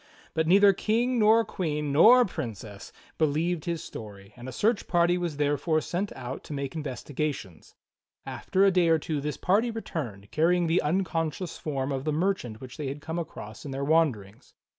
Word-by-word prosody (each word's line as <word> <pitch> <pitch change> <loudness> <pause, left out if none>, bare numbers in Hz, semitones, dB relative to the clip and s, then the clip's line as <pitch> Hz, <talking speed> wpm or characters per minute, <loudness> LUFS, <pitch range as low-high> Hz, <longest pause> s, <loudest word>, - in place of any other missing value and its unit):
But 160 0 0
neither 200 +3 +6
King 235 +5 0
nor 220 +1 +5
Queen 150 -5 -2
nor 235 - +7
Princess 105 - -7 0.3
believed 160 +2 0
his 170 -2 -3
story, 100 -2 -10
and 125 +1 -8
a - - -6
search 210 - 0
party 175 0 +3
was 175 -4 -3
therefore 150 +2 +1
sent 180 +5 -3
out 125 +2 -7
to - - -7
make 140 -1 -4
investi 145 -3 -6
gations. 125 - -4 0.5
After 195 +1 +1
a 195 - +5
day 180 -2 +3
or 165 -1 +5
two 155 -1 -3
this 150 0 -3
party 210 +6 +2
returned, 125 - -6
carrying 175 +3 +2
the 165 +2 +2
uncon 165 0 0
scious 175 +4 -7
form 140 -2 -2
of 135 -1 -2
the 155 - +1
merchant 155 - -1
which 130 -1 -10
they 150 - -4
had 140 +2 -5
come 160 +3 -4
across 110 -9 -8
in 145 - -7
their 135 +1 -3
wanderings. 130 -11 0
155 Hz, 185 wpm, -27 LUFS, 135-180 Hz, 0.5 s, nor